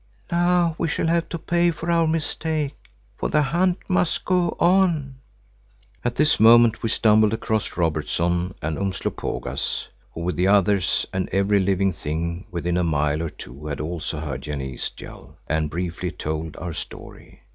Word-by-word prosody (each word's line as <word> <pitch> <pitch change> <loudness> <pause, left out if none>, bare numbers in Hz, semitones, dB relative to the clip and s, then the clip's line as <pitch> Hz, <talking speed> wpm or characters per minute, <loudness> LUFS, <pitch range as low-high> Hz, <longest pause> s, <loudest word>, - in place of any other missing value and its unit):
"Now 175 -1 +3
we 170 - +1
shall 160 - -1
have 170 +1 +1
to 170 - -3
pay 175 +1 +2
for 165 +1 -3
our 165 -1 +3
mistake, 155 -2 0 0.5
for - - -1
the 150 - +3
hunt 175 +6 +1
must 180 -3 +1
go 180 -2 +1
on." 170 -7 +2 0.9
At 120 0 -1
this 150 +2 +3
moment 115 0 +6
we 115 - -1
stumbled 110 -1 +4
across 110 -1 -2
Robertson 85 +2 0
and 80 0 -2
Umslopogaas 95 -8 -3 0.2
who, 85 - -6
with 90 +2 -2
the 90 +2 +2
others, 100 -2 +3
and 95 0 -1
every 100 +2 +2
living 95 0 +1
thing 85 +4 -4
within 85 0 -1
a 90 - +2
mile 75 -1 +1
or 85 - -2
two 70 +2 -10
had 75 - -4
also 80 0 -3
heard 70 -4 -4
Janee's 65 -3 -4
yell, 75 +3 -12
and 80 -1 0
briefly 90 +2 -3
told 80 -2 -4
our 85 0 -5
story. - - -9
95 Hz, 160 wpm, -23 LUFS, -, 0.9 s, moment